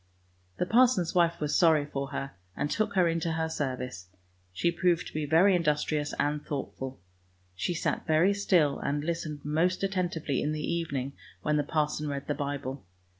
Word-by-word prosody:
The - - 0
parson's 225 -4 +4
wife 170 -1 +3
was 150 -1 -1
sorry 160 -4 +5
for 140 -1 -4
her, 140 -1 -4 0.3
and 145 - -1
took 215 -2 0
her 180 -2 +4
into 165 0 0
her 160 0 0
service; 125 - -4 0.4
she 135 - +1
proved 170 0 +1
to - - -9
be 150 -1 -2
very 180 +6 +5
in 175 - +2
dustrious 150 -1 0
and 150 0 0
thoughtful. 135 -3 -5 0.5
She 170 - -2
sat 170 - -2
very 165 +5 +4
still, 180 -8 +2
and 145 +1 -1
listened 155 -3 -3
most 170 +6 +1
attentively 175 -7 -1
in 150 - 0
the 155 - -3
evening 140 -5 -2 0.3
when 150 0 +2
the 145 - +2
parson 150 0 -1
read 140 -1 -3
the 145 - -1
Bible. 140 -2 -4
155 Hz, 175 wpm, -29 LUFS, 145-170 Hz, 0.5 s, sorry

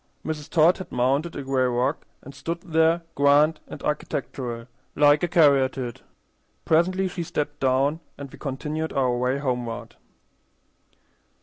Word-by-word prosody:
Mrs. 150 -2 -4
Todd 165 +3 +4
had 185 - -8
mounted 135 +7 0
a 140 - -4
gray 130 -1 +1
rock, 125 +1 -1 0.2
and 140 - -11
stood 170 +5 -5
there 165 -1 +2
grand 145 +2 +4
and - - -9
architectural, 125 -5 -3 0.3
like 145 0 +5
a 175 - +1
caryatide. 135 -7 +2 0.6
Presently 185 +4 +2
she 180 -1 -5
stepped 150 -3 -3
down, 135 +4 +2 0.2
and 140 -2 -8
we - - -13
continued 150 +3 -4
our 130 -3 +1
way 125 +2 0
homeward. 120 -4 -4
145 Hz, 135 wpm, -24 LUFS, 130-160 Hz, 0.6 s, like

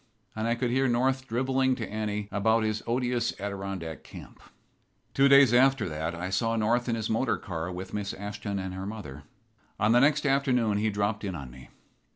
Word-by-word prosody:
And 110 +1 -2
I 115 - +1
could 120 0 -1
hear 135 +2 +2
North 130 +2 +1
drivelling 130 +2 +1
to 115 -4 -5
Annie 105 -1 -3
about 110 +2 +2
his 110 0 -1
odious 120 0 -1
Adirondack 95 -6 -5
camp. - - -12 0.7
Two 135 +1 +5
days 140 -3 +7
after 130 -2 +4
that 80 +2 -3
I 90 +2 -4
saw 115 +4 +1
North 120 +3 +1
in 115 - +1
his 110 -1 -3
motor 115 +3 0
car 85 -1 -5
with 95 +1 -7
Miss 100 -1 -2
Ashton 100 0 -5
and 95 -1 -4
her 95 +1 -5
mother. 75 -11 -8 0.5
On 105 +1 +3
the 120 - +6
next 150 +1 +3
afternoon 125 -6 +2
he 110 +1 +1
dropped 105 +1 -1
in 95 -3 -3
on 70 -6 -8
me. 65 +1 -14
110 Hz, 190 wpm, -28 LUFS, 100-125 Hz, 0.7 s, days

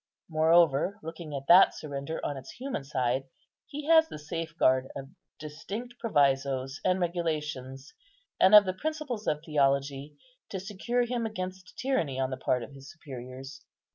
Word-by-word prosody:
Moreover, 160 +3 +3
looking 165 -2 -7
at 135 0 -5
that 180 +3 +7
surrender 140 +1 -5
on 145 - -2
its 135 - -9
human 260 - -4
side, 130 -1 -1 0.4
he 290 +1 -6
has 320 0 +5
the - - -7
safeguard 150 -4 0
of 135 0 -7 0.3
distinct 205 +11 -7
provisos 135 - +1
and 185 0 +2
regulations, 150 -6 -3 0.5
and 190 +3 +7
of 210 -1 +10
the 185 - -1
principles 285 -2 -4
of 150 +1 0
theology, 140 -1 0 0.3
to 190 - -4
secure 210 +6 -1
him 240 -1 -2
against 185 -3 -7
tyranny 170 - -1
on 130 0 0
the 130 - -3
part 125 -1 0
of - - -10
his 135 +1 -12
superiors. 135 -2 -9
155 Hz, 150 wpm, -29 LUFS, 135-195 Hz, 0.5 s, of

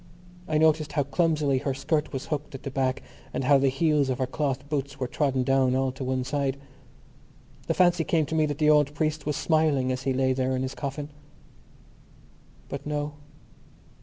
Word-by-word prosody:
I 155 - +1
noticed 155 -1 +3
how 145 - +2
clumsily 150 -2 +1
her 135 -1 -2
skirt 150 +3 -1
was 135 -2 -4
hooked 150 -2 -4
at 135 - -9
the 135 - -4
back 130 0 -1 0.3
and - - -1
how 140 +1 +5
the 135 0 +3
heels 145 0 +2
of 130 - 0
her 130 - 0
cloth 135 0 -2
boots 140 -1 -3
were 130 - -1
trodden 135 0 0
down 130 -1 +2
all 130 0 +1
to 130 +1 -7
one 130 0 -1
side. 135 +1 -1 1.1
The - - 0
fancy 175 -2 +4
came 160 -1 +1
to 150 - -6
me 155 -1 +2
that 145 -1 -3
the 155 -1 +2
old 150 -1 +3
priest 155 0 -1
was 150 - 0
smiling 155 -6 +2
as 130 0 -2
he 135 +1 0
lay 130 0 +2
there 130 0 0
in 130 - -1
his 130 - -3
coffin. 145 +1 -5 1.6
But 140 +1 -6
no. 150 0 -2
140 Hz, 195 wpm, -26 LUFS, 130-150 Hz, 1.6 s, how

